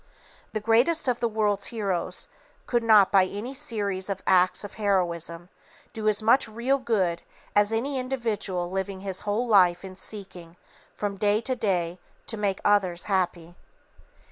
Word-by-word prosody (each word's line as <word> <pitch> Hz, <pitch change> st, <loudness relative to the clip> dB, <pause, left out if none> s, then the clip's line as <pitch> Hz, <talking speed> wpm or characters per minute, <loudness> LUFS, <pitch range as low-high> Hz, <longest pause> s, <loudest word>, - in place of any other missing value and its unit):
The 215 Hz, -, -1 dB
greatest 235 Hz, +10 st, +2 dB
of 245 Hz, -1 st, +1 dB
the 235 Hz, -, +1 dB
world's 210 Hz, -2 st, 0 dB
heroes 200 Hz, -7 st, -3 dB, 0.4 s
could 240 Hz, -1 st, +1 dB
not 215 Hz, -4 st, +6 dB
by 195 Hz, -2 st, +5 dB
any 210 Hz, +7 st, -6 dB
series 200 Hz, -7 st, -3 dB
of 195 Hz, -, -4 dB
acts 185 Hz, +1 st, +3 dB
of 205 Hz, -, -8 dB
heroism 175 Hz, -3 st, -1 dB, 0.4 s
do 215 Hz, -1 st, -3 dB
as 215 Hz, 0 st, +2 dB
much 235 Hz, +4 st, +4 dB
real 240 Hz, +5 st, 0 dB
good 190 Hz, -9 st, 0 dB, 0.3 s
as 205 Hz, +1 st, +4 dB
any 260 Hz, +5 st, -1 dB
individual 220 Hz, -9 st, -2 dB
living 190 Hz, 0 st, -3 dB
his 190 Hz, -1 st, -2 dB
whole 210 Hz, +4 st, -1 dB
life 185 Hz, -5 st, +4 dB
in 185 Hz, -1 st, -9 dB
seeking, 185 Hz, -4 st, -8 dB, 0.4 s
from 205 Hz, -1 st, -3 dB
day 205 Hz, +1 st, +2 dB
to 255 Hz, +2 st, -2 dB
day, 180 Hz, -6 st, -1 dB, 0.3 s
to 225 Hz, -, -3 dB
make 200 Hz, -3 st, -1 dB
others 190 Hz, -4 st, +2 dB
happy. 175 Hz, -3 st, -1 dB
205 Hz, 155 wpm, -26 LUFS, 185-225 Hz, 0.4 s, not